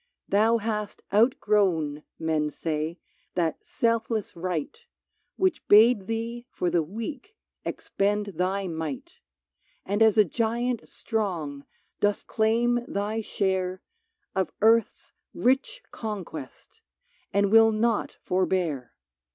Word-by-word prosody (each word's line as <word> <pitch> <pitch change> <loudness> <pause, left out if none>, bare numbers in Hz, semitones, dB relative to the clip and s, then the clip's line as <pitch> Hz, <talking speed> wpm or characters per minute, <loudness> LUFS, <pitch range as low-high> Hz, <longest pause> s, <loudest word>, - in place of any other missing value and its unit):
Thou 220 +3 +4
hast 210 -2 -3
outgrown, 200 - +2 0.2
men 155 -2 0
say, 155 +2 -3 0.4
that 165 -3 -1
selfless 230 -2 -1
Right 175 - -3 0.6
Which 375 -1 0
bade 215 -1 +6
thee 230 +2 -4
for 180 -7 -1
the 170 - +3
weak 230 - -6 0.3
expend 205 0 -1
thy 190 +2 0
might; 245 - -5 0.7
And 205 +3 -1
as 220 -1 +5
a 210 - +7
giant 235 +4 -1
strong, 170 -11 -3 0.3
dost 205 0 +1
claim 235 +2 +2
thy 210 +3 -2
share 190 -3 -1 0.5
Of 190 -1 0
earth's 225 +1 +3 0.2
rich 280 - +1
conquest, 185 - -7 0.5
and 200 0 +2
will 225 0 +7
naught 220 0 0
for 185 0 +1
bear. 160 -9 -1
205 Hz, 110 wpm, -26 LUFS, 180-230 Hz, 0.7 s, a